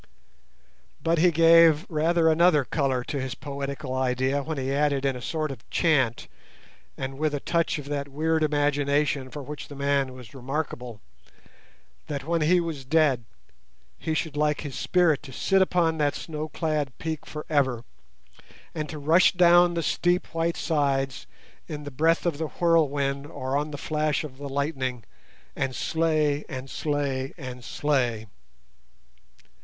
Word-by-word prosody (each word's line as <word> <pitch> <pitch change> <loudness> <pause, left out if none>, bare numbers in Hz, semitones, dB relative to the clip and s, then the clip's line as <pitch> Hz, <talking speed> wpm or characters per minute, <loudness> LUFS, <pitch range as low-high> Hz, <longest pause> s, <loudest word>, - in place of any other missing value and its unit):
But 165 0 +2
he 180 +2 +6
gave 165 0 +6
rather 165 +1 +2
another 160 -3 +4
colour 135 -4 0
to 140 +2 -3
his 130 -1 -4
poetical 140 0 -5
idea 130 +2 0
when 155 +2 -4
he 135 0 -2
added 140 -1 +1
in 135 -1 +1
a 125 - -7
sort 155 +2 -2
of 125 -5 -11
chant, 130 -8 +1 0.7
and 135 +1 -5
with 155 -1 0
a - - -2
touch 165 +3 0
of 145 - -7
that 145 -1 -2
weird 160 +3 0
imagination 145 -2 +1
for 145 +1 -7
which 150 +2 -7
the 145 - -10
man 140 -1 0
was 125 -5 -12
remarkable, 125 -4 -5 1.1
that 140 -3 -4
when 165 +2 0
he 175 +4 +4
was 165 -5 -4
dead 140 -4 +2 0.7
he 160 - -2
should 155 -1 -2
like 150 0 +1
his 145 -3 -6
spirit 175 -3 +2
to 140 - -11
sit 195 +9 +2
upon 170 -4 +2
that 145 -1 +1
snow 155 -1 -5
clad 150 -4 -2
peak 160 -2 -5
for 150 0 -7
ever, 130 -6 +1 0.9
and 155 -2 -4
to 155 - -6
rush 160 +5 +4
down 175 -1 +5
the 170 - -1
steep 175 +2 0
white 165 +1 0
sides 135 -4 0 0.4
in 150 -3 -6
the 145 - -7
breath 165 +6 +2
of 165 -4 -1
the 160 - -1
whirlwind, 145 -5 +1
or 130 -3 -4
on 150 +2 0
the 145 - -6
flash 155 +1 -1
of 135 -3 -9
the 140 -1 -6
lightning, 135 -4 -2 0.5
and 135 -1 -2
"slay, 155 -3 +1
and 130 -2 -6
slay, 140 -3 -2
and 125 -5 -8
slay". 125 -8 0
145 Hz, 160 wpm, -26 LUFS, 135-160 Hz, 1.1 s, he